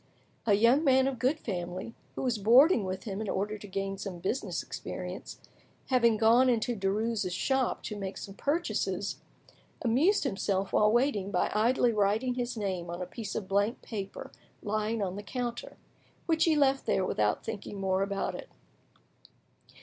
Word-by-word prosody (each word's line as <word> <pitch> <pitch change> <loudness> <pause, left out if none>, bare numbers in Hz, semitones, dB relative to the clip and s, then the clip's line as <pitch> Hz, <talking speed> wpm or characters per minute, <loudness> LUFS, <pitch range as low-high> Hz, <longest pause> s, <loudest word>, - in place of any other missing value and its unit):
A 205 - +6
young 235 +8 +4
man 265 -3 +4
of 265 -3 -3
good 265 +5 +2
family, 180 - -5 0.2
who - - -3
was 245 -4 0
boarding 240 - +6
with 185 0 -4
him 200 -2 -4
in 215 - -3
order 205 +2 -2
to 205 - -10
gain 195 0 -3
some 195 -3 -5
business 190 +9 -2
experience, - - -7 0.5
having 235 -4 +4
gone 230 +4 +5
into 240 0 +1
Derues' 205 0 -1
shop 260 +8 0
to 210 - -5
make 195 -1 -5
some 195 - -7
purchases, 310 - -1 0.7
amused 285 - +3
himself 195 -5 -1
while 210 0 +4
waiting 235 -5 +1
by 185 -3 0
idly 235 +3 +3
writing 215 +5 +1
his 245 -1 -3
name 185 -5 -3
on 175 +1 -5
a 180 - -3
piece 215 +1 -6
of 195 - -3
blank 200 +4 0
paper 200 -4 -6 0.3
lying 215 +1 -1
on 190 0 -3
the - - -4
counter; 240 +2 -5 0.5
which 320 -1 +3
he 325 -2 +3
left 275 -2 +2
there 185 - +2
without 105 - 0
thinking 205 -2 -6
more 190 0 +1
about 195 0 -1
it. - - -8
215 Hz, 165 wpm, -30 LUFS, 195-250 Hz, 0.7 s, A